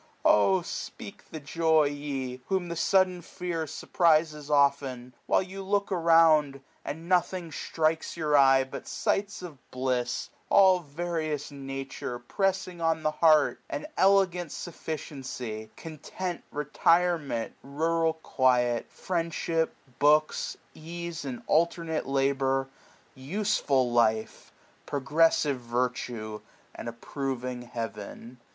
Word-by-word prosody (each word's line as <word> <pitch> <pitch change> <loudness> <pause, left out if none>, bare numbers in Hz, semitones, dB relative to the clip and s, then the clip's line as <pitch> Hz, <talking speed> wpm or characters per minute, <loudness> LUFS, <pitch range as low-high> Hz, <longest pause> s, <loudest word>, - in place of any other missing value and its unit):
Oh, 185 - +5
sj^eak 200 +2 -7
the 155 - -6
joy! 160 +1 +2
ye, 140 -3 -4
whom 190 -3 -1
the 170 - -3
sudden 185 +1 +2
tear 170 -1 -4
Surprizes 155 -3 +1
often, 140 -3 +1
while - - +3
you 190 +1 -8
look 200 +1 0
around^ 165 -5 +4
i - - -9
i5j - - -21 0.2
And 160 +3 -6
nothing 180 -1 +1
strikes 160 +2 -1
your 150 -2 +1
eye 135 -1 +6
but 130 - -8
sights 200 -1 -1
of 160 -7 -9
bliss^ 125 -1 -1 0.2
All 190 -2 +6
various 155 -1 -3
Nature 135 -2 -5
pressing 185 +6 -2
on 165 -1 +1
the 155 - +2
heart; 155 -1 +4
An - - -4
elegant 185 -4 +3
sufficiency, 130 -9 -6
content, 170 +3 -6
Retirement, 150 -3 +1
rural 160 +4 0
quiet, 125 -6 +1
friendship, 165 -2 -1 0.2
books^ 150 +1 +3 0.2
Ease 170 -1 -6
and 130 -3 -5
alternate 165 -1 +1
labour, 135 -1 +1 0.4
useful 140 - 0
life^ 110 -2 +1 0.4
Progressive 145 -1 +2
virtue, 120 -3 -3 0.3
and - - -6
approving 125 +1 -4
Heaven. 115 0 -7
155 Hz, 110 wpm, -28 LUFS, 130-170 Hz, 0.4 s, eye